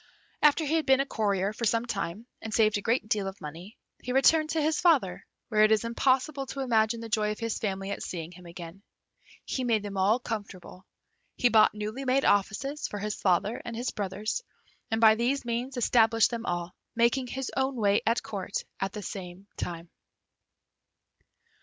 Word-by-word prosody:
After 300 +2 +4
he 295 - -1
had 320 -2 +1
been 265 0 +5
a 275 - +2
courier 200 -5 0
for 235 - -3
some 230 +2 +1
time, 200 -1 -4 0.2
and 220 - -6
saved 215 -1 +3
a - - -7
great 230 +1 0
deal 205 -3 0
of 195 0 -7
money, 170 +8 -9 0.2
he 250 - -4
returned 310 +4 +4
to 320 - 0
his 310 +2 +1
father, 280 - +2 0.2
where 215 -2 +4
it 215 - +5
is 220 0 +3
impossible 265 +4 +1
to 275 - -5
imagine 230 -2 +1
the 230 - -6
joy 215 -1 0
of 210 - -5
his 230 -2 -3
family 195 -2 -3
at - - -4
seeing 170 -2 -5
him 180 0 -13
again. 170 +2 -10 0.6
He 260 - -2
made 225 -4 +1
them 200 -1 -5
all 200 +5 +3
comfortable. 200 -6 -7 0.5
He 245 - +4
bought 215 -2 +5
newly 215 +5 -4
made 265 +1 +2
offices 240 +9 +1
for 210 - -6
his 210 +1 -3
father 195 +4 0
and 230 - -6
his 240 +2 -2
brothers, 205 - -3 0.5
and 225 - 0
by 220 -1 +7
these 245 +4 0
means 245 +3 -3
established 225 -2 +4
them 235 0 -4
all, 175 0 -2 0.2
making 240 +2 +2
his 265 +1 -4
own 265 0 0
way 205 -3 +2
at 230 +1 +1
Court 200 -1 -6 0.2
at 195 0 -2
the 210 - -6
same 185 0 -7
time. 170 -1 -5
220 Hz, 190 wpm, -28 LUFS, 200-250 Hz, 0.6 s, by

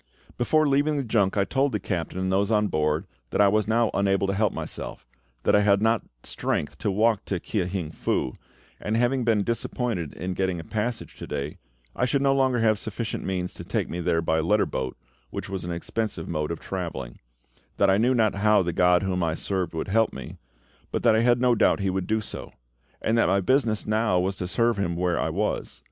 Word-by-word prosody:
Before 155 +5 +2
leaving 145 +2 +2
the 140 - 0
junk 105 -4 +1
I 100 - +4
told 135 +6 +1
the 105 - 0
captain 90 -1 -3
and 95 0 -1
those 100 +2 +2
on 105 -2 +2
board 75 +1 0 0.2
that - - -2
I 100 - +7
was 105 0 +2
now 115 0 +2
unable 100 0 +2
to 95 - 0
help 105 +1 +2
myself; - - -6 0.4
that - - +4
I 105 - +5
had 100 -1 +4
not 115 +1 +2 0.2
strength 75 0 -2
to 105 - 0
walk 110 +2 +2
to 95 - -2
Kia 95 0 -2
hing 90 -4 -3
Fu, 65 - -1 0.4
and 110 +2 -1
having 125 +2 +2
been 110 -3 +2
disappointed 115 - -2
in 90 +2 -3
getting 95 -1 -1
a - - -6
passage 110 +5 -3
to - - -8
day, 70 +2 -4 0.4
I 125 - +1
should 135 +2 +1
no 135 -1 +4
longer 130 -2 +2
have 110 -2 +3
sufficient 110 0 -4
means 90 -1 -2
to - - -8
take - - -2
me 85 - -3
there 85 -1 +1
by 80 0 +1
letter 105 +7 +2
boat, 65 -1 -4 0.3
which - - -6
was 95 -3 -4
an 90 - -3
expensive 95 +1 -3
mode 75 -3 -2
of 85 - -4
travelling; 80 -10 -5 0.6
that 100 -1 +4
I 95 - +3
knew 125 +3 +3
not 110 -3 +3
how 105 0 +3
the 85 -1 -2
GOD 90 +2 +4
whom 95 -1 -1
I 80 -2 0
served 95 -2 -2
would 80 - -3
help 115 +2 +2
me, 65 -2 -8 0.5
but - - -2
that 110 - +5
I 110 - +3
had 120 0 +4
no 125 -1 +4
doubt 110 - +3
He 100 -1 0
would 95 -1 -2
do 110 0 +1
so; - - -8 0.5
and 110 - +2
that - - +4
my 100 - +3
business 110 +1 +1
now 110 -4 +2
was 95 +2 0
to 90 - -3
serve 115 +3 +2
Him 85 -4 -1
where 90 0 0
I - - 0
was. 100 +6 -2
100 Hz, 225 wpm, -25 LUFS, 90-115 Hz, 0.6 s, I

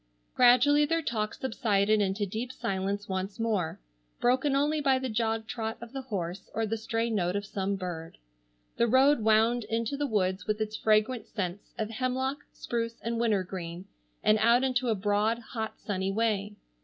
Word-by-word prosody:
Gradually 255 +4 +6
their 330 +2 +1
talk 215 -4 -2
subsided 215 -4 +1
into 200 +1 0
deep 220 +6 -4
silence 200 -2 -2
once 190 +2 -3
more, 210 -8 -1 0.4
broken 260 +3 +2
only 295 +2 +2
by 270 -2 +3
the 260 0 -3
jog 225 0 0
trot 225 -1 -4
of 235 +1 -10
the 270 - -4
horse 190 -6 -5
or 225 - +1
the 220 +1 -1
stray 225 +1 -2
note 180 -4 0
of 205 0 -2
some 200 -1 -2
bird. 175 -4 -6 0.6
The 235 - +3
road 265 +4 +5
wound 220 +2 +3
into 230 +3 -1
the 290 +1 -1
woods 190 -5 0
with 215 0 0
its 215 0 -2
fragrant 215 +2 +2
scents 190 -2 -5
of 220 0 -2
hemlock, 260 +3 -1
spruce 230 -1 -3
and 230 0 -2
wintergreen, 185 -5 -2 0.4
and 215 0 +4
out 235 +3 +4
into 255 -1 +1
a 225 - +2
broad, 205 +3 +1
hot, 225 -2 -5
sunny 190 -2 -2
way. 210 -1 0
220 Hz, 170 wpm, -29 LUFS, 200-245 Hz, 0.6 s, Gradually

